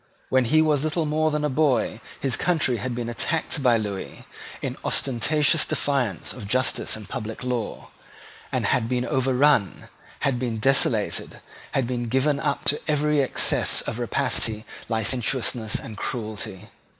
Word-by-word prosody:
When 130 Hz, -1 st, +3 dB
he 155 Hz, +6 st, +4 dB
was 150 Hz, -2 st, +2 dB
little 155 Hz, +1 st, 0 dB
more 155 Hz, +1 st, +1 dB
than 150 Hz, -1 st, -1 dB
a -, -, +3 dB
boy 130 Hz, -6 st, +1 dB, 0.2 s
his 135 Hz, -3 st, +1 dB
country 155 Hz, -8 st, +1 dB
had 125 Hz, +2 st, -3 dB
been 120 Hz, -1 st, -3 dB
attacked 150 Hz, +5 st, -1 dB
by 125 Hz, -3 st, +4 dB
Lewis 105 Hz, -3 st, -5 dB, 0.4 s
in -, -, -4 dB
ostentatious 145 Hz, +5 st, +2 dB
defiance 125 Hz, -, -1 dB
of 100 Hz, -, -8 dB
justice 130 Hz, +4 st, 0 dB
and 110 Hz, -2 st, -10 dB
public 110 Hz, -3 st, -5 dB
law, 125 Hz, -3 st, -3 dB, 0.6 s
had 115 Hz, -2 st, +1 dB
been 125 Hz, -1 st, 0 dB
overrun, 130 Hz, -, +2 dB, 0.3 s
had 135 Hz, -3 st, +1 dB
been 120 Hz, -3 st, -2 dB
desolated, 115 Hz, -3 st, +1 dB, 0.3 s
had 135 Hz, -, +1 dB
been 120 Hz, -1 st, -3 dB
given 140 Hz, +3 st, +2 dB
up 140 Hz, -, -1 dB
to 150 Hz, -, +2 dB
every 150 Hz, -1 st, +2 dB
excess 135 Hz, -, +2 dB
of -, -, -5 dB
rapacity, 110 Hz, -1 st, 0 dB, 0.2 s
licentiousness, 115 Hz, 0 st, 0 dB
and 110 Hz, -, -4 dB
cruelty. 110 Hz, -5 st, -5 dB
125 Hz, 145 wpm, -24 LUFS, 115-145 Hz, 0.6 s, he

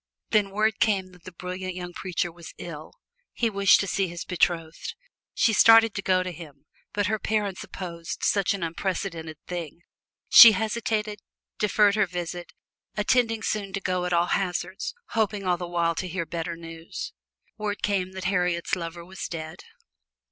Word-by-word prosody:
Then 205 Hz, -2 st, +3 dB
word 215 Hz, +2 st, 0 dB
came 190 Hz, -4 st, +1 dB
that 180 Hz, -2 st, -19 dB
the 185 Hz, -, -8 dB
brilliant 185 Hz, +1 st, -5 dB
young 180 Hz, -1 st, -6 dB
preacher 175 Hz, -2 st, -2 dB
was 170 Hz, 0 st, -12 dB
ill; 155 Hz, -3 st, -8 dB, 0.4 s
he 230 Hz, -2 st, 0 dB
wished 195 Hz, -3 st, +5 dB
to 200 Hz, -, -3 dB
see 195 Hz, 0 st, 0 dB
his 170 Hz, -1 st, -6 dB
betrothed. 165 Hz, -2 st, -1 dB, 0.4 s
She 225 Hz, -, +3 dB
started 225 Hz, 0 st, +7 dB
to 195 Hz, -, -3 dB
go 185 Hz, -1 st, +2 dB
to 185 Hz, -, -4 dB
him, 150 Hz, -4 st, -12 dB, 0.3 s
but 205 Hz, 0 st, 0 dB
her 215 Hz, +3 st, 0 dB
parents 205 Hz, -3 st, -1 dB
opposed 170 Hz, -3 st, -7 dB
such 200 Hz, -1 st, +2 dB
an 190 Hz, -, -5 dB
unprecedented 165 Hz, -2 st, -3 dB
thing. 170 Hz, -2 st, -6 dB, 0.5 s
She 230 Hz, -2 st, +11 dB
hesitated, 215 Hz, 0 st, -1 dB, 0.4 s
deferred 210 Hz, 0 st, +4 dB
her 210 Hz, -2 st, +2 dB
visit 175 Hz, 0 st, -5 dB, 0.5 s
intending 225 Hz, +1 st, +2 dB
soon 200 Hz, -3 st, -2 dB
to 195 Hz, -, -1 dB
go 185 Hz, -1 st, -1 dB
at 180 Hz, -, -2 dB
all 170 Hz, 0 st, +3 dB
hazards 185 Hz, -, -2 dB
hoping 210 Hz, -3 st, 0 dB
all 180 Hz, -1 st, +2 dB
the 175 Hz, 0 st, -5 dB
while 170 Hz, -1 st, +1 dB
to 185 Hz, -, -4 dB
hear 175 Hz, -1 st, -3 dB
better 170 Hz, 0 st, -4 dB
news. 165 Hz, 0 st, -8 dB, 0.5 s
Word 210 Hz, -1 st, -3 dB
came 190 Hz, -2 st, 0 dB
that 190 Hz, 0 st, -6 dB
Harriet's 180 Hz, -2 st, +1 dB
lover 170 Hz, -1 st, -6 dB
was 190 Hz, +1 st, -6 dB
dead. 160 Hz, -1 st, -7 dB
185 Hz, 170 wpm, -26 LUFS, 170-205 Hz, 0.5 s, She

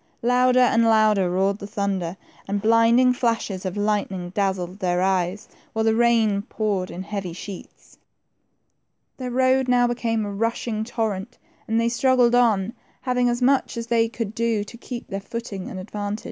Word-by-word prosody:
Louder 250 Hz, +1 st, +4 dB
and 230 Hz, -2 st, +4 dB
louder 215 Hz, -4 st, +4 dB
roared 195 Hz, +3 st, 0 dB
the 200 Hz, -, -7 dB
thunder, 195 Hz, -4 st, -2 dB, 0.3 s
and 200 Hz, +1 st, -1 dB
blinding 230 Hz, +4 st, +4 dB
flashes 225 Hz, -6 st, -1 dB
of 185 Hz, -, -5 dB
lightning 200 Hz, -4 st, -1 dB
dazzled 190 Hz, -1 st, -2 dB
their 180 Hz, -2 st, 0 dB
eyes, 185 Hz, +1 st, 0 dB, 0.3 s
while 220 Hz, 0 st, 0 dB
the 225 Hz, -, +3 dB
rain 225 Hz, -3 st, +3 dB
poured 200 Hz, -3 st, -2 dB
in 185 Hz, -, -6 dB
heavy 190 Hz, -3 st, -5 dB
sheets. 185 Hz, +1 st, -11 dB, 1.2 s
Their 255 Hz, -1 st, -4 dB
road 260 Hz, +1 st, +2 dB
now 245 Hz, -1 st, +4 dB
became 230 Hz, -2 st, -1 dB
a 205 Hz, -, -4 dB
rushing 230 Hz, +1 st, -2 dB
torrent, 220 Hz, -1 st, -3 dB, 0.3 s
and 225 Hz, +1 st, +1 dB
they 230 Hz, -, +2 dB
struggled 245 Hz, 0 st, +3 dB
on, 225 Hz, -4 st, +3 dB, 0.3 s
having 250 Hz, -1 st, +1 dB
as 240 Hz, +1 st, -1 dB
much 265 Hz, -2 st, +2 dB
as 230 Hz, -, -3 dB
they 230 Hz, -1 st, +2 dB
could 225 Hz, -2 st, -4 dB
do 230 Hz, -2 st, 0 dB
to 215 Hz, +3 st, -12 dB
keep. 240 Hz, 0 st, -8 dB
their 195 Hz, -1 st, -5 dB
footing, 205 Hz, -3 st, -6 dB
and 185 Hz, -, -6 dB
advance. 205 Hz, +2 st, -4 dB
220 Hz, 165 wpm, -23 LUFS, 195-235 Hz, 1.2 s, Louder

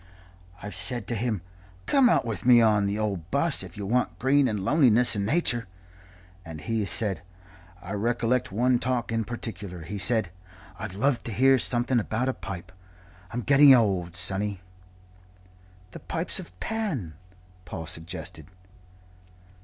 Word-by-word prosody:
I've 105 Hz, -, -6 dB
said 120 Hz, -5 st, 0 dB
to 120 Hz, -, 0 dB
him, 110 Hz, -5 st, -2 dB, 0.4 s
'Come 265 Hz, -3 st, +4 dB
out -, -, +2 dB
with 110 Hz, -6 st, -4 dB
me 125 Hz, -1 st, +7 dB
on 105 Hz, -3 st, +3 dB
the 100 Hz, +1 st, -2 dB
old 100 Hz, -6 st, -3 dB
'bus 140 Hz, +3 st, +1 dB
if 95 Hz, -1 st, -10 dB
you 100 Hz, -, -5 dB
want 105 Hz, -6 st, 0 dB
green 135 Hz, +5 st, +3 dB
and 105 Hz, -5 st, -3 dB
loneliness 125 Hz, -5 st, +4 dB
and 100 Hz, -1 st, -1 dB
nature.' 120 Hz, -, 0 dB, 0.8 s
And 80 Hz, -3 st, -9 dB
he 115 Hz, +5 st, -2 dB
has 100 Hz, -, -2 dB
said 100 Hz, -8 st, 0 dB, 0.6 s
I 95 Hz, -, -8 dB
recollect 120 Hz, +3 st, 0 dB
one 120 Hz, +4 st, +2 dB
talk 125 Hz, -2 st, -1 dB
in 115 Hz, -1 st, -1 dB
particular 100 Hz, -6 st, -6 dB
he 100 Hz, +6 st, -6 dB
said, 110 Hz, -2 st, +1 dB, 0.5 s
'I'd 110 Hz, -4 st, -6 dB
love 130 Hz, +3 st, +1 dB
to 115 Hz, -, -3 dB
hear' 130 Hz, +5 st, +4 dB
something 120 Hz, +1 st, +1 dB
about 115 Hz, +4 st, -1 dB
a -, -, 0 dB
pipe 90 Hz, -5 st, -8 dB, 0.6 s
I'm 120 Hz, -, -4 dB
getting 140 Hz, +1 st, +7 dB
old, 95 Hz, -7 st, 0 dB
sonny 95 Hz, +2 st, 0 dB, 0.7 s
" 90 Hz, 0 st, -28 dB
"The -, -, -9 dB
Pipes -, -, -1 dB
of 90 Hz, +1 st, -11 dB
Pan?" 185 Hz, -, -3 dB, 0.5 s
Paul 80 Hz, -2 st, -6 dB
suggested. 80 Hz, -1 st, -6 dB
110 Hz, 155 wpm, -26 LUFS, 95-125 Hz, 0.8 s, me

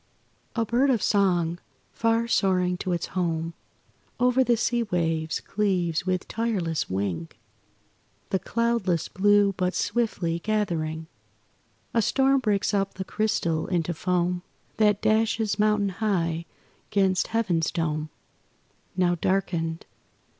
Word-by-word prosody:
A 230 Hz, -2 st, +1 dB
bird 245 Hz, +5 st, +2 dB
of 240 Hz, -6 st, +2 dB
song, 175 Hz, -4 st, +2 dB, 0.3 s
far 230 Hz, 0 st, +1 dB
soaring 185 Hz, -5 st, +2 dB
to 185 Hz, 0 st, -3 dB
its 175 Hz, -, -1 dB
home, 165 Hz, -2 st, -1 dB, 0.7 s
Over 250 Hz, +1 st, +4 dB
the 240 Hz, -2 st, +2 dB
sea 240 Hz, +1 st, +1 dB
waves 165 Hz, -6 st, -1 dB
cleaves 185 Hz, -5 st, -1 dB
with 185 Hz, -1 st, -1 dB
tireless 200 Hz, -9 st, -1 dB
wing 95 Hz, -4 st, -2 dB, 1.0 s
The 190 Hz, -, +2 dB
cloudless 225 Hz, -7 st, 0 dB
blue; 205 Hz, +1 st, +3 dB
but, 180 Hz, 0 st, 0 dB
swiftly 180 Hz, -8 st, -1 dB
gathering, 165 Hz, -6 st, -1 dB, 0.9 s
A 230 Hz, -, +3 dB
storm 270 Hz, +4 st, +3 dB
breaks 210 Hz, -5 st, 0 dB
up 195 Hz, -1 st, 0 dB
the 190 Hz, -, -5 dB
crystal 185 Hz, -7 st, 0 dB
into 175 Hz, -2 st, 0 dB
foam 180 Hz, +1 st, 0 dB, 0.4 s
That 210 Hz, -1 st, +3 dB
dashes 220 Hz, -1 st, +1 dB
mountain 210 Hz, -1 st, +3 dB
high 170 Hz, -5 st, -1 dB, 0.4 s
'gainst 190 Hz, -2 st, +2 dB
Heaven's 190 Hz, -8 st, 0 dB
dome 155 Hz, -2 st, -2 dB, 0.9 s
Now 180 Hz, -1 st, +3 dB
darkened. 170 Hz, -2 st, -1 dB
190 Hz, 120 wpm, -26 LUFS, 170-215 Hz, 1.0 s, Over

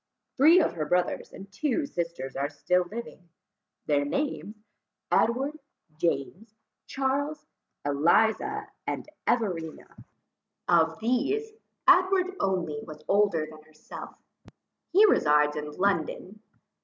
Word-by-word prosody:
Three 315 Hz, +6 st, +7 dB
of 315 Hz, -, +1 dB
her 155 Hz, -3 st, -3 dB
brothers 180 Hz, +2 st, 0 dB
and 195 Hz, +1 st, -11 dB
two 295 Hz, +7 st, -1 dB
sisters 170 Hz, -, -4 dB
are 140 Hz, +1 st, -1 dB
still 175 Hz, +5 st, +1 dB
living; 215 Hz, -6 st, -8 dB, 0.6 s
their 145 Hz, -1 st, +2 dB
names, 225 Hz, -, -3 dB, 0.6 s
Edward, 270 Hz, +7 st, +1 dB, 0.4 s
James, 170 Hz, -, -2 dB, 0.3 s
Charles, 280 Hz, +3 st, -2 dB, 0.4 s
Eliza, 220 Hz, -, +2 dB, 0.2 s
and -, -, -3 dB, 0.2 s
Everina. 180 Hz, -9 st, -2 dB, 0.6 s
Of 165 Hz, 0 st, +3 dB
these, 275 Hz, -, 0 dB, 0.4 s
Edward 370 Hz, 0 st, +4 dB
only 175 Hz, -6 st, -1 dB
was 155 Hz, 0 st, -11 dB
older 200 Hz, -6 st, +2 dB
than 155 Hz, 0 st, -13 dB
herself; 155 Hz, 0 st, -11 dB, 0.8 s
he 400 Hz, +5 st, +7 dB
resides 150 Hz, -, +3 dB
in 150 Hz, 0 st, -4 dB
London. 195 Hz, +2 st, -1 dB
195 Hz, 105 wpm, -27 LUFS, -, 0.8 s, Three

